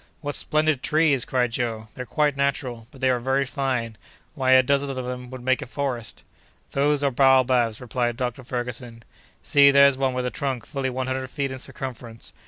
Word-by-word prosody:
"What 145 -1 -3
splendid 155 -3 +1
trees!" 150 -4 +2
cried 125 -2 0
Joe. 115 -2 -3
"They're 125 -1 -7
quite 150 -2 +1
natural, 130 -4 -2
but 135 -3 -16
they 130 - +3
are 125 - 0
very 135 +3 0
fine! 125 -5 -3 0.3
Why 130 -3 +2
a 130 0 +7
dozen 140 +2 +1
of 135 - -4
them 125 -1 -5
would 130 -1 -9
make 130 0 +1
a - - -6
forest!" 125 -4 -4 0.5
"Those 145 +1 +1
are 140 - +2
baobabs," 130 -3 +3
replied 120 -1 -2
Dr. 125 +1 -3
Ferguson. 120 -1 -5 0.4
"See, 140 -1 +6
there's 140 -1 +5
one 130 -1 0
with 125 0 -1
a 125 - -2
trunk 135 -6 -3
fully 135 -3 -3
one 130 0 -3
hundred 130 0 -3
feet 140 0 -3
in 130 - -6
circumference. 120 -3 -8
130 Hz, 190 wpm, -24 LUFS, 125-140 Hz, 0.5 s, a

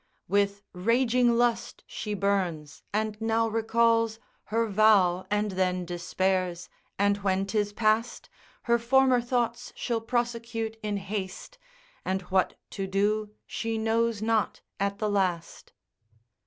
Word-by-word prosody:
With 200 +1 +1
raging 235 +4 +2
lust 240 -1 0
she 210 -1 -5
burns, 185 -7 -1
and 215 +1 -1
now 225 0 +2
recalls 230 0 +2 0.3
Her 230 +2 0
vow, 200 -4 +4
and 210 0 0
then 185 -1 0
despairs, 180 0 -1 0.3
and 200 0 +2
when 195 -1 0
'tis 205 0 -1
past, 215 +2 0 0.4
Her 235 0 +2
former 255 +1 +4
thoughts 240 -1 -1
she'll 235 -2 -2
prosecute 230 -1 -2
in 210 -2 -2
haste, 195 - -6 0.4
And 190 0 -2
what 190 -1 +2
to 195 -1 -4
do 210 +2 0
she 225 -1 -3
knows 225 0 0
not 220 -1 0 0.2
at 200 0 -1
the 215 - -1
last. 185 -5 -1
215 Hz, 125 wpm, -27 LUFS, 195-230 Hz, 0.4 s, vow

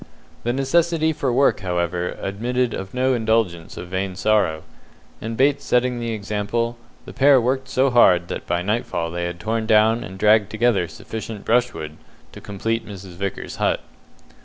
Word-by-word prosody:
The 120 - 0
necessity 160 +4 +1
for 135 -3 -1
work, 135 +3 +3
however, 90 -1 -2
admitted 120 +5 -1
of 95 +4 -6
no 130 +1 +2
indulgence 110 -8 0
of 90 - -7
vain 95 0 -3
sorrow, 95 -7 +1 0.6
and 115 +1 -5
Bates 140 +1 +2
setting 125 0 +1
the 115 0 -3
example, 110 +2 -2 0.3
the - - -10
pair 140 -1 +5
worked 130 +2 -1
so 135 0 +2
hard 90 -8 +5
that - - -6
by 85 0 0
nightfall 100 -5 -2
they 85 0 -3
had 85 0 -5
torn 110 +3 -2
down 110 +1 +4
and 95 +1 -9
dragged 105 0 +4
together 110 -5 +1
sufficient 110 +5 -7
brushwood 115 -11 0 0.3
to - - -11
complete 115 +3 -2
Mrs. 100 -2 -10
Vickers's 100 +2 -5
hut. - - +1
110 Hz, 160 wpm, -22 LUFS, 95-125 Hz, 0.6 s, pair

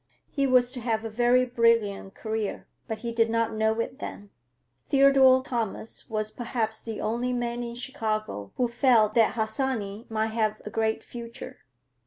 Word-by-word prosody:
He 275 -2 +1
was 250 -1 +4
to 255 - -4
have 225 -2 -1
a 225 - -4
very 245 +3 +3
brilliant 230 -5 +1
career, 220 -2 -3 0.2
but 220 - -3
he 235 - -1
did 230 -1 +2
not 230 0 0
know 220 +1 +1
it 250 +4 -3
then. 205 -7 -7 0.6
Theodore 270 -2 +6
Thomas 230 -2 -4
was 215 -1 -2
perhaps 225 -2 -3
the 225 -2 -6
only 240 +3 -1
man 240 0 -2
in 235 -1 -5
Chicago 215 - -3
who 250 - +1
felt 235 -3 +3
that 230 -1 +3
Harsanyi 220 -2 -2
might 220 0 -1
have 215 -1 0
a 210 - -6
great 220 0 0
future. 235 -1 -9
230 Hz, 165 wpm, -27 LUFS, 220-245 Hz, 0.6 s, Theodore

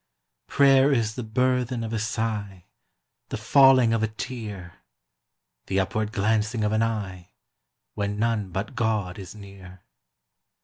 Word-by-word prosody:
Prayer 135 0 +4
is 115 -5 +1
the 125 - -5
burthen 125 +1 0
of 115 0 -5
a 110 - -1
sigh, 105 -4 -3 0.6
The - - -4
falling 130 +1 +5
of 115 - 0
a 110 - +1
tear 105 -6 -7 0.9
The 95 - 0
upward 105 +2 -1
glancing 110 +2 0
of 105 - +1
an 110 0 +1
eye, 95 -6 -3 0.6
When 100 0 -3
none 110 -3 -1
but 95 +8 -4
God 110 -6 -1
is 95 +1 -9
near. 95 -3 -13
110 Hz, 135 wpm, -25 LUFS, 100-115 Hz, 0.9 s, falling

